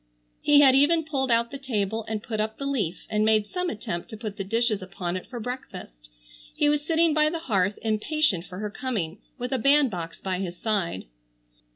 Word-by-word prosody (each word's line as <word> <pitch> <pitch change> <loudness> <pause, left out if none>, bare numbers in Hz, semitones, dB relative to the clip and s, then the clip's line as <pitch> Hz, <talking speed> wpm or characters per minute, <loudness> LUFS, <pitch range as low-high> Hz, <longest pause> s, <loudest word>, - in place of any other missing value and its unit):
He 290 0 +6
had 270 -2 +7
even 310 +5 +4
pulled 270 -4 -1
out 235 0 +2
the 275 - -6
table 220 -4 -2
and 215 -1 -3
put 220 -2 -4
up 220 +1 -1
the 275 - -4
leaf, 210 -11 -2
and 215 -1 +1
made 215 -1 +3
some 360 -1 -1
attempt 175 -5 -5
to 220 - -7
put 210 -2 -5
the 200 - -3
dishes 225 +1 0
upon 185 -1 -4
it 185 - -5
for 245 - -6
breakfast. 215 - -7 0.5
He 295 - +2
was 295 0 +1
sitting 325 0 +3
by 305 0 +4
the 335 - -3
hearth 205 - 0
impatient 220 - +1
for 180 - -9
her 210 +1 -4
coming, 210 -9 -3 0.2
with 245 0 -4
a 260 - +1
bandbox 230 - +2
by 185 -2 -3
his 180 -2 -4
side. 195 - -1
220 Hz, 205 wpm, -26 LUFS, 195-275 Hz, 0.5 s, had